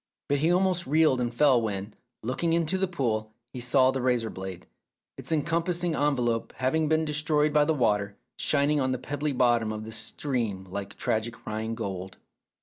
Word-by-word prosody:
But 145 0 +2
he 160 +4 +3
almost 180 -2 +2
reeled 150 -3 +3
and 120 -1 -1
fell 130 -1 +4
when, 105 -1 -3 0.3
looking 135 +8 0
into 170 +3 +1
the 190 - +2
pool, 110 -10 -2 0.2
he 125 - -5
saw 130 +2 +3
the 130 -1 -2
razor 120 -3 +1
blade, 95 -7 -7 0.5
its - - -5
encompassing 170 +2 0
en 145 -1 +2
velope 120 -2 -1
having 150 +5 0
been 160 0 +2
destroyed 150 0 +1
by 150 -1 +5
the 160 +1 +1
water, 105 -5 +1 0.2
shining 145 0 +2
on 130 0 +1
the - - -1
pebbly 145 +3 -2
bottom 120 -4 +2
of 110 0 -5
the 110 - -7
stream 115 -4 -2
like 100 +1 -5
tragic 110 +1 -2
Rhine 110 +1 -3
gold. 95 -4 -5
130 Hz, 180 wpm, -27 LUFS, 110-155 Hz, 0.5 s, by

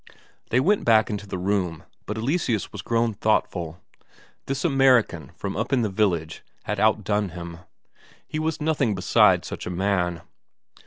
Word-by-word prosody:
They 125 - +3
went 200 +10 +2
back 110 -2 +4
into 105 -1 -5
the 95 - -4
room, 90 -3 -1 0.2
but 105 - -3
Eleseus 120 - -1
was 105 - -7
grown 115 +1 0
thoughtful. 90 -6 -1 0.7
This 135 +3 -2
American 130 - +3
from 100 -1 -5
up 110 +6 -2
in 130 -3 +2
the 110 - 0
village 90 -6 0 0.2
had - - -3
outdone 105 -2 +1
him; 85 -1 -8 0.7
he 155 - -4
was 160 0 -1
nothing 145 -8 +1
beside 90 -1 +4
such - - -6
a - - -2
man. 90 -2 -1
105 Hz, 155 wpm, -24 LUFS, 90-125 Hz, 0.7 s, back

